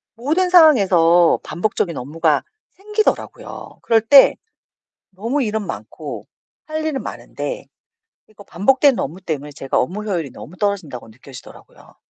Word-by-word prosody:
모든 320 +10 0
상황에서 190 - +5
반복적인 175 -1 -2
업무가 150 +3 0 0.3
생기더라고요. 420 +2 -3
그럴 225 -2 +2
때 275 +5 +7 0.8
너무 230 +9 -2
일은 215 -2 -2
많고 - - -8 0.4
할 310 0 -4
일은 290 -4 -2
많은데 - - -6 0.6
이거 205 -1 -16
반복되는 260 - +2
업무 170 +8 -5
때문에 150 -4 -5
제가 135 -1 -3
업무 195 +11 -3
효율이 170 -10 -3
너무 175 - -12
떨어진다고 180 - -3
느껴지더라고요. 130 +3 -15
200 Hz, 325 characters per minute, -19 LUFS, 165-275 Hz, 0.8 s, 때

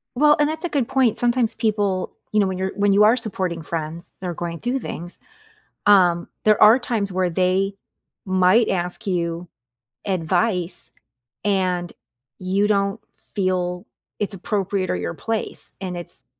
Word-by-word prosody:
Well, 295 +3 +5
and 295 - +4
that's 315 +2 -4
a - - -1
good 275 -7 0
point, 260 -5 +2
sometimes 240 -1 +1
people, 205 -4 0 0.2
you 215 - +2
know, 200 - +3
when 190 -1 -3
you're 190 +1 -2
when 200 0 +3
you 205 +1 +6
are 220 +4 +5
supporting 185 -7 -3
friends, 165 +2 -5
they're 180 -2 -3
going 170 0 -5
through 250 +3 -1
things. 175 -6 -7 0.7
Um, 180 -4 +5 0.2
there 215 -1 +4
are 220 +4 +8
times 220 -5 -2
where 185 -1 +1
they 185 +3 +1 0.5
might 190 +4 +4
ask 180 +4 -2
you 170 -1 -1 0.6
advice, 180 - 0 0.5
and 185 -4 0 0.5
you 190 +3 +1
don't 200 0 +1 0.3
feel 180 -2 -1 0.3
it's 205 -1 -2
appropriate 195 0 -2
or - - +1
your 90 -1 -3
place, 225 -1 -4
and 180 -2 -4
it's 175 - -10
190 Hz, 155 wpm, -22 LUFS, 180-215 Hz, 0.7 s, are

